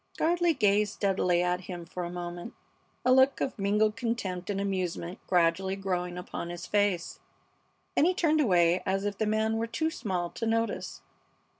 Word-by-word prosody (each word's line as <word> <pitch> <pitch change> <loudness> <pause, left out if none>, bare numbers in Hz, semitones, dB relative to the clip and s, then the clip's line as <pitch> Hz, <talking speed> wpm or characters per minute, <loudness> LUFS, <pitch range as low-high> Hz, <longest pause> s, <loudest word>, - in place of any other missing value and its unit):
Gardley 340 0 +2
gazed 210 -2 +3
steadily 180 -3 +1
at 180 0 0
him 175 -2 -6
for 180 +1 -5
a 170 - -4
moment, 175 +4 -6 0.5
a 255 - +5
look 265 +1 +5
of 260 - -2
mingled 210 +2 +2
contempt 210 -6 -3
and 200 -1 -1
amusement 185 -2 -2
gradually 180 +2 +2
growing 180 -2 -2
upon 180 -1 -5
his 175 0 -6
face. 205 -4 0 0.8
Then - - +4
he 365 +1 +2
turned 315 -3 +3
away 175 - +3
as 195 +1 -1
if 205 -1 -3
the 220 - +1
man 220 +1 +1
were 230 +1 -1
too 315 +8 -1
small 180 - -3
to 230 - -3
notice. 230 0 -1
195 Hz, 170 wpm, -29 LUFS, 180-225 Hz, 0.8 s, a